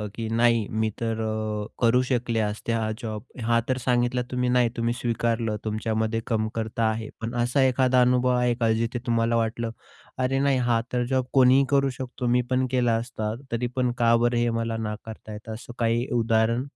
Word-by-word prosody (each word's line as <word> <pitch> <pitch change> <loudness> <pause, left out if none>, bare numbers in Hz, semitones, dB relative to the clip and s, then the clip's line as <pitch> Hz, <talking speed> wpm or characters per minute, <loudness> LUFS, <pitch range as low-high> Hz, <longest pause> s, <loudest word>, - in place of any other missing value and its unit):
की 115 -1 -4
नाही, 115 -1 +2
मी 110 0 0
तर 115 -1 -1
अ, 110 -1 -2 0.2
करू 120 +2 +4
शकले 120 -2 0
असते 105 +2 -2
हा 110 -1 0
जॉब. 110 -1 -5 0.2
हा 115 +1 +3
तर 130 - +1
सांगितला 125 0 +2
तुम्ही 125 0 0
नाही. 125 -1 +3
तुम्ही 115 +1 0
स्वीकारलं 115 -2 -1
तुमच्यामध्ये 110 +1 -1
कमतरता 110 0 -1
आहे. 110 0 -3
पण 115 +1 -4
असा 125 +3 +1
एखादा 130 0 +3
अनुभव 125 0 +3
आहे 125 -1 +2
का? 115 -2 +1
जिथे 115 +2 -1
तुम्हाला 115 0 +1
वाटलं, 115 0 -1 0.5
"अरे, 130 +1 +1
नाही 140 -1 +2
हा 115 -1 +3
तर 125 0 +1
जॉब 130 -1 +1
कोणीही 135 +1 +6
करू 140 -1 +3
शकतो. 125 -1 -4
मी 125 +1 +3
पण 130 0 +2
केला 120 -3 +2
असता. 115 -2 -3 0.2
तरी 120 +1 -1
पण 125 -1 +1
का 115 0 +5
बरं 120 0 +1
हे 120 0 +2
मला 115 0 -2
नाकारत 110 0 -6
आहेत?" 110 +1 -8
असं 115 +2 -8
काही 115 +1 +1
उदाहरण? 115 +2 +2
115 Hz, 185 wpm, -25 LUFS, 110-125 Hz, 0.5 s, कोणीही